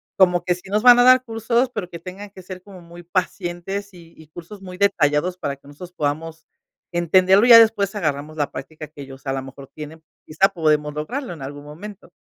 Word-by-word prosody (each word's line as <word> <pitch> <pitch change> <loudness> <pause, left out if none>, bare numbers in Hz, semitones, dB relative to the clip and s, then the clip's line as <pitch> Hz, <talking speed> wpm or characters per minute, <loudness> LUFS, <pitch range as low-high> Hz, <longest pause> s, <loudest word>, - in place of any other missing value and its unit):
como 180 -2 +3
que 180 - +1
sí 180 +2 -12
nos 210 +3 0
van 245 -1 +8
a - - +6
dar 255 0 +6
cursos, 235 +2 -1
pero 180 - -5
que 170 - -8
tengan 190 +3 -9
que 190 -2 -14
ser 185 0 -9
como 190 -2 -14
muy 170 +1 -13
pacientes, 185 +2 -4
y 170 -2 -16
y 160 - -16
cursos 175 +6 -12
muy 180 -1 -10
detallados 180 -3 +1
para 140 -5 -4
que 140 - -22
nosotros 175 +5 -11
podamos 160 0 -4 0.5
entenderlo 185 +5 +4
y - - +2
ya, 230 - +11
después, 215 -2 +2
agarramos 155 -3 -3
la 145 - -2
práctica 155 +2 -9
que 150 -1 -13
ellos, 135 0 -12
a 135 - -2
lo 135 - -3
mejor, 135 0 -12
tienen. 155 +1 -10 0.2
Quizá 190 +6 +2
podemos 150 -4 0
lograrlo 225 - -5
en 155 - -12
algún 145 +2 -8
momento. 190 +8 -11
175 Hz, 215 wpm, -21 LUFS, 150-200 Hz, 0.5 s, ya